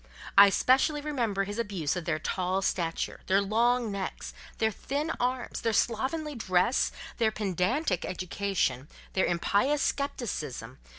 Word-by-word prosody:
I 200 0 +9
specially 265 +8 +3
remember 240 -10 -1
his 205 +3 -5
abuse 190 -10 -1
of 180 -2 -4
their 165 -3 0
tall 185 +4 -1
stature, 170 -3 -1
their 190 +1 +4
long 230 +3 +2
necks, 195 -1 -5 0.2
their 220 -1 +2
thin 290 +8 -3
arms, 250 +1 -2
their 225 - 0
slovenly 275 +9 0
dress, 220 0 +1 0.3
their 225 -2 +4
pedantic 200 - 0
education, 180 -7 -1 0.3
their 190 - +2
impious 205 +11 +1
scepticism 240 - -4
205 Hz, 130 wpm, -29 LUFS, 185-250 Hz, 0.3 s, I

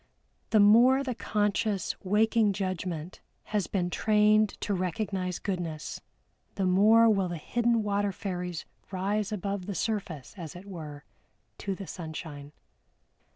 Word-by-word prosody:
The 215 - +4
more 240 +6 +6
the 260 -2 -2
conscious 210 -2 0
waking 210 +1 +3
judgment 185 -3 -4 0.3
has 205 -3 +1
been 180 -3 -1
trained 215 0 +4
to 205 - -1
recognize 185 0 -2
goodness, 175 -6 -4 0.5
the 195 - 0
more 215 +5 +6
will 195 -4 +3
the 175 -1 -4
hidden 235 +6 +1
water 205 0 0
fairies 180 -4 -4 0.2
rise 200 +2 -1
above 200 -2 -3
the 200 - -3
surface, 180 - -3
as 165 -4 -7
it 180 +2 -10
were, 155 -7 -8 0.6
to 195 -1 -3
the 195 - -7
sunshine. 155 -4 -7
195 Hz, 130 wpm, -29 LUFS, 180-210 Hz, 0.6 s, more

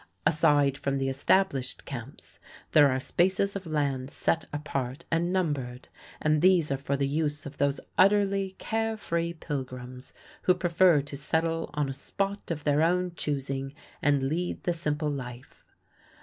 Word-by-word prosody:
Aside 145 -3 +3
from 140 0 -1
the 135 0 0
established 135 -1 +1
camps 135 0 -8 0.3
there 145 -2 +7
are 130 0 0
spaces 190 +7 +1
of 190 -3 -5
land 140 -4 -1
set 165 +3 0
apart 140 -1 -4
and 170 +2 +1
numbered, 140 -9 -2 0.3
and 155 0 +2
these 175 -5 +4
are 135 - +1
for 140 +1 -2
the 140 0 +1
use 150 0 -1
of 145 0 -9
those 140 0 +1 0.2
utterly 195 -1 +3
care 225 0 -1
free 170 -4 -1
pilgrims 130 -5 -6 0.3
who 180 - +4
prefer 175 -2 +4
to 140 0 -8
settle 165 +3 -1
on 150 -1 +1
a 135 - -3
spot 200 +8 -3
of 155 -3 -3
their 145 0 +3
own 180 +2 +2
choosing 135 -2 -3 0.3
and 145 -2 +3
lead 175 +5 -2
the 175 - +1
simple 150 -2 -1
life. 125 -2 -8
150 Hz, 155 wpm, -28 LUFS, 135-175 Hz, 0.3 s, there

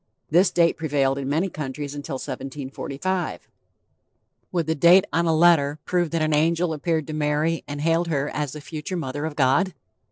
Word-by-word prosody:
This 180 +4 +5
date 170 -1 +2
prevailed 140 -3 0
in 135 0 -3
many 160 +7 +1
countries 145 -3 -5
until 145 0 -5
1745. 140 +7 -4 1.0
Would 170 -3 0
the 160 - 0
date 175 +6 +6
on 170 +2 +2
a 160 - +3
letter 155 -3 +4
prove 175 -2 0
that 165 -1 0
an 155 0 +1
angel 165 +2 +2
appeared 155 0 -1
to 155 - -6
Mary 155 +2 0
and 145 0 -5
hailed 165 +2 +1
her 145 -3 0
as 150 -3 -3
the 150 - -8
future 155 +4 -5
Mother 145 -1 -4
of 160 -2 -4
God? 145 +7 +2
155 Hz, 180 wpm, -24 LUFS, 145-170 Hz, 1.0 s, date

